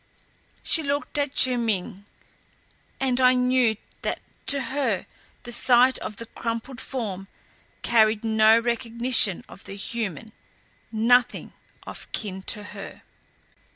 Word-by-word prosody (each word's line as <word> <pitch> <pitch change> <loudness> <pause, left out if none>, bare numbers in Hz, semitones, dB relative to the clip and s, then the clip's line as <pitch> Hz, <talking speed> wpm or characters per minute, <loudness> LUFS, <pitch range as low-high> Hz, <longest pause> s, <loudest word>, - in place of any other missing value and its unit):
She 325 - +4
looked 285 0 -1
at 285 -1 -2
Chiu 255 -1 +4
Ming 205 -3 -2 0.9
and 260 -1 +1
I 255 0 +6
knew 250 -2 +2 0.3
that - - -2 0.3
to 280 - +6
her 255 -10 0 0.4
the 240 - -8
sight 250 +1 +4
of 210 - -6
the 230 - -6
crumpled 230 +3 -5
form 200 -7 -5 0.6
carried 220 -1 +3
no 220 0 +5
recognition 235 -3 +1
of 195 - -14
the 195 - -7
human, 220 -1 -5 0.6
nothing 240 +2 +2 0.3
of - - -9
kin 190 -3 -4
to 210 -2 +1
her. 200 -1 -10
230 Hz, 120 wpm, -25 LUFS, 215-255 Hz, 0.9 s, I